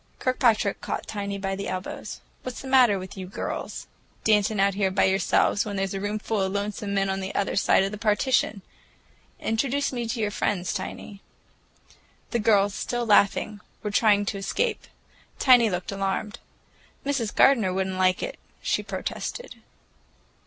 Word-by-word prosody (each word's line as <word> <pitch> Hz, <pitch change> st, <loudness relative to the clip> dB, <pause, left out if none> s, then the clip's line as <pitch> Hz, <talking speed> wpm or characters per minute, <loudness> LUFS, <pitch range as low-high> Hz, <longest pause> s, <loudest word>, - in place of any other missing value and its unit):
Kirkpatrick 235 Hz, -6 st, +1 dB
caught -, -, -4 dB
Tiny 200 Hz, -1 st, -4 dB
by 195 Hz, -1 st, -2 dB
the 200 Hz, -, -5 dB
elbows. 185 Hz, 0 st, -5 dB, 0.2 s
"What's 255 Hz, -1 st, -6 dB
the 270 Hz, -, -8 dB
matter 255 Hz, -6 st, +5 dB
with 185 Hz, 0 st, -8 dB
you 190 Hz, -2 st, -6 dB
girls? 190 Hz, -, -5 dB, 0.4 s
Dancing 210 Hz, -1 st, +3 dB
out 195 Hz, 0 st, +3 dB
here 195 Hz, 0 st, +1 dB
by 190 Hz, -, +2 dB
yourselves, 190 Hz, +2 st, +2 dB
when 205 Hz, -1 st, -5 dB
there's 195 Hz, 0 st, -1 dB
a 195 Hz, -, -3 dB
roomful 210 Hz, +1 st, -2 dB
of 190 Hz, 0 st, 0 dB
lonesome 200 Hz, 0 st, -3 dB
men 195 Hz, 0 st, +2 dB
on 190 Hz, 0 st, -1 dB
the 190 Hz, 0 st, -5 dB
other 200 Hz, -, 0 dB
side 195 Hz, -, +4 dB
of 195 Hz, -, -1 dB
the 210 Hz, -, -7 dB
partition! 215 Hz, -2 st, +1 dB, 0.8 s
Introduce 275 Hz, +5 st, 0 dB
me 240 Hz, -2 st, -2 dB
to 230 Hz, +1 st, -3 dB
your 210 Hz, -2 st, 0 dB
friends, 185 Hz, -3 st, -1 dB
Tiny." 200 Hz, 0 st, -6 dB, 1.1 s
The 235 Hz, -, +1 dB
girls, 205 Hz, -2 st, +3 dB
still 240 Hz, +2 st, -2 dB
laughing, 205 Hz, 0 st, +3 dB, 0.2 s
were 210 Hz, -, -2 dB
trying 205 Hz, -1 st, +4 dB
to 200 Hz, 0 st, -3 dB
escape. 455 Hz, -, -1 dB, 0.5 s
Tiny 245 Hz, -4 st, +6 dB
looked 180 Hz, 0 st, -3 dB
alarmed. 195 Hz, +3 st, -2 dB, 0.7 s
"Mrs. 265 Hz, -7 st, -1 dB
Gardener 230 Hz, -9 st, +5 dB
would 190 Hz, +1 st, 0 dB
n't 190 Hz, 0 st, -4 dB
like 185 Hz, 0 st, +2 dB
it," -, -, -5 dB, 0.2 s
she -, -, 0 dB
protested. -, -, -5 dB
205 Hz, 165 wpm, -25 LUFS, 195-225 Hz, 1.1 s, Tiny